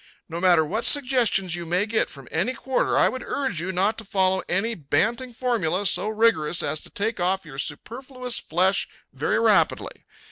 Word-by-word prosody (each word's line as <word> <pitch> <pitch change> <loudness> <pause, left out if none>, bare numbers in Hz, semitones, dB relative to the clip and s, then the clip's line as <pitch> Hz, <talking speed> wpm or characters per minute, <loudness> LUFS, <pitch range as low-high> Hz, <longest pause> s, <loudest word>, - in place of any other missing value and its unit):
No 170 0 -5
matter 175 -3 +4
what 215 +9 -3
suggestions 245 - +2
you 175 - -5
may 180 +4 +1
get 220 0 0
from 140 -3 -12
any 190 +11 -1
quarter, 265 -1 0
I - - +5
would 260 - -4
urge 240 - -2
you 185 +2 -3
not 195 +5 0
to - - -6
follow 190 -2 +1
any 220 +6 0
banting 220 - -1
formula 210 -7 -1
so 205 - +1
rigorous 215 -8 +1
as 150 +2 -2
to - - -9
take 215 +1 -3
off 185 +1 0
your 135 -3 -9
superfluous 250 - -4
flesh 185 +4 +1 0.3
very - - -1
rapidly. - - +1
195 Hz, 180 wpm, -24 LUFS, 175-230 Hz, 0.3 s, I